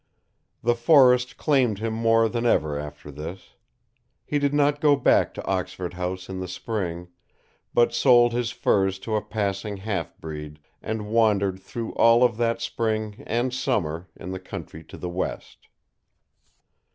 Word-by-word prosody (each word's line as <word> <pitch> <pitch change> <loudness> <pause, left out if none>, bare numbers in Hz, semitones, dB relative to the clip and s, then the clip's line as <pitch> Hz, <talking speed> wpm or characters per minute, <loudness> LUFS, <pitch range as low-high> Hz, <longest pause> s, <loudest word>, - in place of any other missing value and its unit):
The 120 - +3
forest 125 0 +4
claimed 130 -8 +2
him 110 +2 -3
more 115 0 +3
than 115 +1 -2
ever 75 -11 +2
after 75 0 -7
this. 80 +6 -9 0.7
He 145 - 0
did 140 -1 +1
not 145 0 +2
go 150 -2 +5
back - - +3
to - - -7
Oxford 95 -1 -3
House 90 +1 -4
in 95 -1 -5
the 95 - -4
spring 90 -3 -4 0.6
but 120 0 +3
sold 120 -1 +5
his 120 -1 -1
furs 95 -6 +1
to 110 +3 -3
a 105 - +1
passing 100 -1 -3
half 95 -4 -4
breed, 75 -1 -8 0.2
and 110 -1 -4
wandered 100 -4 +2
through 115 +4 -6
all 115 +1 +5
of 120 -3 +2
that 115 0 0
spring 110 -2 -2
and 120 +2 0
summer 90 - -1
in 90 - -8
the 95 - -4
country 85 -4 -9
to - - -11
the 90 - -5
west. 90 +1 -5
110 Hz, 155 wpm, -25 LUFS, 95-120 Hz, 0.7 s, go